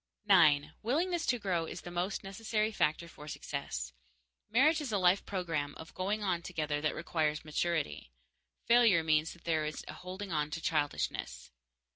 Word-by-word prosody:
_9. 160 -7 +6
Willingness 335 - 0
to 245 - +3
grow 185 -6 -1
is - - -6
the 175 - -8
most 175 +3 -2
necessary 215 +2 -1
factor 165 -3 0
for 150 -2 -12
success. 65 - -4 0.6
Marriage 300 +8 +4
is 275 -6 -4
a 205 - +2
life 185 +1 +4
program 165 -7 -2
of 160 - -11
going 205 +3 -1
on 180 -4 0
together 155 -4 -2
that 155 - 0
requires 155 -2 -1
maturity; 155 - -1 0.5
failure 230 -8 +5
means 155 0 +2
that 170 - -19
there 160 -2 +1
is 155 0 -4
a - - -6
holding 185 +2 -7
on 150 -2 0
to 160 +2 -4
childishness. 150 -3 -2
175 Hz, 165 wpm, -32 LUFS, 155-205 Hz, 0.6 s, 9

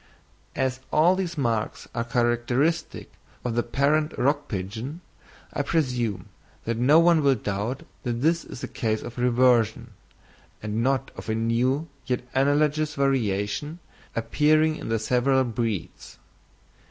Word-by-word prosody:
As 130 -1 -1
all 170 +4 +5
these 180 -3 -3
marks 115 -5 -1
are 115 - -1
characteristic 120 +6 0 0.3
of 120 - -1
the 120 - +2
parent 150 +6 +1
rock 145 +2 +1
pigeon, 110 - -5 0.5
I - - 0
presume 125 - -1 0.4
that 115 0 -1
no 140 +7 +5
one 170 -1 +5
will 140 -2 +4
doubt 105 +4 -3 0.2
that 120 - -2
this 165 +3 +2
is - - -10
a - - -2
case 110 -1 -2
of 120 +1 -7
reversion, 120 -2 +3 0.7
and 105 +1 -2
not 135 +2 0
of - - -8
a 110 - +1
new 120 +7 +1 0.2
yet 125 -2 -1
analogous 150 +2 +2
variation 135 - 0 0.4
appearing 155 +7 +2
in - - -7
the 115 - +1
several 125 +4 +2
breeds. 115 -5 -4
125 Hz, 135 wpm, -25 LUFS, 115-150 Hz, 0.7 s, all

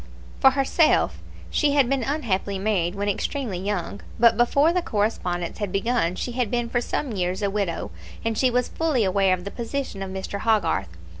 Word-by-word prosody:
For 265 - +7
herself, 275 +4 +2 0.3
she 295 -2 +2
had 280 -3 +4
been 270 +1 0
unhappily 225 -8 -1
married 190 -3 0
when 200 +1 -2
extremely 205 0 -2
young; 200 0 -3 0.2
but 235 0 +6
before 280 +7 +3
the 360 - +1
correspondence 205 - -2
had 205 -3 -2
begun 195 -3 0
she 245 - -3
had 240 -2 -1
been 240 0 -1
for 240 - 0
some 265 +2 -2
years 185 0 -2
a 200 - +1
widow, 195 - -2 0.3
and 225 -1 0
she 255 +3 +3
was 250 0 +1
fully 310 -8 +1
aware 190 -1 +3
of 180 - -10
the 200 - -6
position 235 -3 -4
of 195 - -4
Mr. 190 +1 -5
Hogarth. 210 - +1
215 Hz, 190 wpm, -24 LUFS, 195-250 Hz, 0.3 s, For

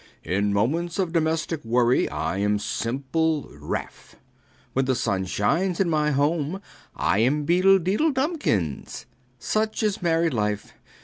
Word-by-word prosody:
In 100 +2 0
moments 160 - 0
of 180 -4 -1
domestic 160 -1 0
worry, 120 +2 +2
I 80 +5 -2
am 105 +1 +1
simple 140 +8 -1
Ralph. - - -6 0.6
When 135 0 +1
the 130 0 +1
sun 95 -6 -1
shines 165 - 0
in 185 -4 +2
the 150 -1 +2
home, 150 +5 0 0.4
I 100 - +1
am 145 +6 +2
Beedle 185 +4 +5
Deedle 195 - +1
Dumkins. 265 - -2 0.3
Such 215 - -1
is 210 -2 0
married 165 -2 +1
life! 105 -2 -2
150 Hz, 135 wpm, -24 LUFS, 110-175 Hz, 0.6 s, Beedle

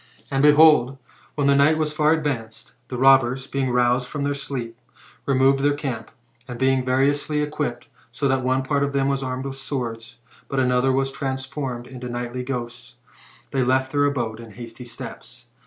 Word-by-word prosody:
And, 135 -1 +1
behold, 150 -3 +6 0.4
when 145 - 0
the 140 0 +4
night 145 +3 +4
was 155 -1 -1
far 155 0 +3
advanced, 135 -9 -3
the 125 - -5
robbers, 130 0 +4
being 135 -1 -2
roused 125 +1 +2
from 145 +2 -4
their 145 0 0
sleep, 130 -4 -5 0.5
removed 135 0 +3
their 145 +1 +2
camp; 130 -6 -5 0.4
and, 125 -2 -6
being 130 0 +2
variously 145 +3 +1
equipped, 145 -5 -3 0.2
so 140 - -1
that 135 -1 +1
one 130 +1 +1
part 140 +1 0
of 140 0 0
them 135 -1 +1
was 135 -1 -1
armed 130 0 -4
with 135 0 -5
swords, 120 -4 -5 0.3
but 135 - -2
another 125 0 +2
vras 135 +1 0
transformed 130 -2 -4
into 125 -1 -8
nightly 120 +1 -4
ghosts, 125 -2 -6 0.6
they 135 - 0
left 130 +1 +1
their 145 0 +2
abode 120 -6 -2
with 115 -2 -11
hasty 120 +2 -9
steps. 120 - -9
135 Hz, 175 wpm, -23 LUFS, 125-140 Hz, 0.6 s, behold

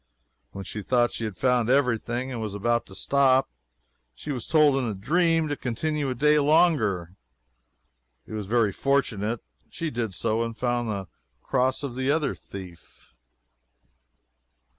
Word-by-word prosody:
When 100 - -7
she 105 - -6
thought 120 +2 +2
she 115 - -3
had 105 -4 -5
found 125 -3 +2
every 125 -4 +3
thing 125 +4 -4
and 120 -3 -4
was 105 -2 -4
about 120 +3 0
to 95 - -10
stop, 135 +1 +3 0.6
she 65 - -6
was 125 -5 -5
told 155 -3 +5
in 130 - 0
a 110 -3 -2
dream 165 - +2
to 145 - -2
continue 145 +4 -2
a 130 - -2
day 150 +4 +4
longer. 140 - +2 1.1
It - - -10
was 105 -3 -4
very 115 -2 +2
fortunate. 115 -3 0 0.3
She 165 -2 -4
did 115 -6 -3
so, 110 +1 0
and 115 -1 -3
found 120 -2 -1
the 100 -3 -3 0.4
cross 130 +1 0
of 140 -4 -4
the 130 +1 -1
other 150 -1 +1
thief. 90 -3 -12
120 Hz, 160 wpm, -26 LUFS, 110-140 Hz, 1.1 s, told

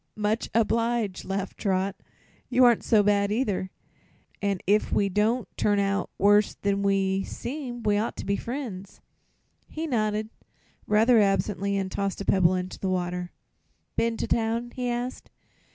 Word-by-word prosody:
"Much 215 +2 -1
obliged," 230 -2 +1
laughed 195 0 -4
Trot. 190 -1 0 0.5
"You 255 0 +4
aren't 240 -2 +4
so 215 -2 +4
bad, 200 0 +2
either, 210 -5 -1 0.7
an' 200 -1 0
if 210 +3 +2
we 200 - +2
don't 215 +5 +1
both - - -43
turn 205 -1 +2
out 200 0 0
worse 205 +1 +4
than 200 0 -1
we 195 -1 +1
seem 245 -1 -6
we 210 -1 +2
ought 220 - -2
to - - -6
be 200 +1 +1
friends." 230 -6 -6 0.7
He 320 +1 -5
nodded, 215 -5 -1 0.6
rather 225 +3 +5
absently, 200 0 +1
and 190 -1 -2
tossed 195 0 -2
a 200 - -5
pebble 185 -1 +3
into 185 0 -4
the 190 - -2
water. 180 -1 -2 0.6
"Been 230 0 0
to - - -2
town?" 230 +1 0
he 250 -1 -3
asked. 245 +1 -4
205 Hz, 155 wpm, -26 LUFS, 195-230 Hz, 0.7 s, rather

